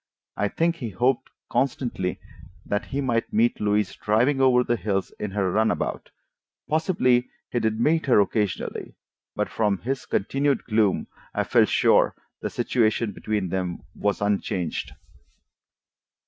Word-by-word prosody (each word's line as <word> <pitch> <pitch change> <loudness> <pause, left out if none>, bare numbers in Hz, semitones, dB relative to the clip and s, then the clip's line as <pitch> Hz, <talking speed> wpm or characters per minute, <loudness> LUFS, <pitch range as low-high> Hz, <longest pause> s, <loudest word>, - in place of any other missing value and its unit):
I 105 - +1
think 165 +9 0
he 120 -8 -4
hoped 120 +6 0 0.2
constantly 120 -8 -1 0.5
that 100 +1 -1
he 140 - -3
might 120 -4 0
meet 230 +2 +2
Louise 105 -1 +1
driving 125 +6 +2
over 125 -2 +5
the 120 - +1
hills 100 -4 -2
in 105 - -3
her 95 -2 0
runabout: 110 +3 0 0.6
possibly 130 -6 +2 0.2
he 120 - +1
did 110 -1 0
meet 155 +6 +2
her 125 - +5
occasionally, 105 -1 -1 0.4
but - - 0
from 105 -3 0
his 130 +7 -4
continued 135 +6 0
gloom 110 -3 +1 0.3
I - - +1
felt - - +3
sure - - +4 0.3
the - - -2
situation 115 -2 +1
between 105 -4 -2
them 90 -1 -3
was 100 0 -1
unchanged. 95 -4 -1
110 Hz, 135 wpm, -25 LUFS, 100-130 Hz, 0.6 s, over